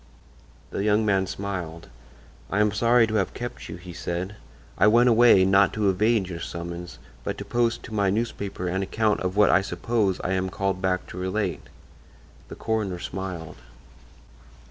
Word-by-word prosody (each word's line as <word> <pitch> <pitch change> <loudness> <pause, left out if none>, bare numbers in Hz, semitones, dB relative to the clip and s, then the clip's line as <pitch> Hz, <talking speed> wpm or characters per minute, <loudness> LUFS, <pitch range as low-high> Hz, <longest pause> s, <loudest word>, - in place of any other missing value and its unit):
The - - -2
young 105 +1 +3
man 95 -2 +2
smiled. 90 -4 -5 0.6
"I 100 - 0
am 105 0 +3
sorry 115 +3 +4
to 110 - -5
have 95 - -1
kept 120 0 -6
you," - - -6
he 90 0 -10
said. 90 +3 -4 0.4
"I 105 - +4
went 120 +3 +5
away, 115 -5 +6
not 95 +1 +4
to 105 -2 +2
evade 105 +1 +2
your 85 -2 -6
summons, 85 +1 -6 0.3
but - - -3
to - - -6
post 120 -1 0
to 115 - -9
my 100 -2 +2
newspaper 100 -3 -2
an 95 +2 -1
account 105 +2 0
of 90 +1 -2
what 105 -1 +6
I 95 - +5
suppose 100 +1 -1
I 90 - -1
am 95 0 0
called 95 -1 -2
back 95 -1 0
to 90 - -7
relate." 95 +1 -2 0.8
The - - -9
coroner 110 -5 -2
smiled. 90 -2 -6
95 Hz, 170 wpm, -25 LUFS, 90-110 Hz, 0.8 s, away